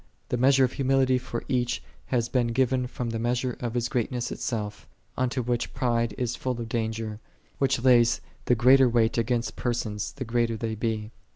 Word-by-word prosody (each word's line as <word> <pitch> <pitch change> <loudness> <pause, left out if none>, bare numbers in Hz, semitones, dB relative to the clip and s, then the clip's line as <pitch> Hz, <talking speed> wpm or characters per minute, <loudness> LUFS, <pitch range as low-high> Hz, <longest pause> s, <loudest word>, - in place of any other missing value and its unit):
x - - -34 0.2
The 125 - 0
measure 135 +2 +5
of 130 - +2
humility 135 -1 +2
for 120 -2 -5
each 125 -2 0 0.2
hath 120 -2 0
been 125 -2 +2
given 125 +1 +1
from 125 -1 -4
Ihe 115 - -2
measure 125 +1 0
of 120 -1 -4
his 120 -1 +1
grealness 125 0 -2
itself: 105 -3 -4 0.3
unto 130 0 0
which 120 0 -2
pride 120 -3 0
is 125 -1 -1
full 125 -2 -3
of 115 - -4
danger, 110 -1 -3 0.4
which 135 -2 +2
layeth 120 -2 +5 0.3
the 125 - +4
greater 130 +2 +6
wait 115 -1 +2
against 120 +1 -1
persons 110 -4 -2
the 135 -2 -5
greater 115 -1 0
Ihey 110 -1 -3
be. 110 -1 -2
120 Hz, 185 wpm, -27 LUFS, 115-125 Hz, 0.4 s, greater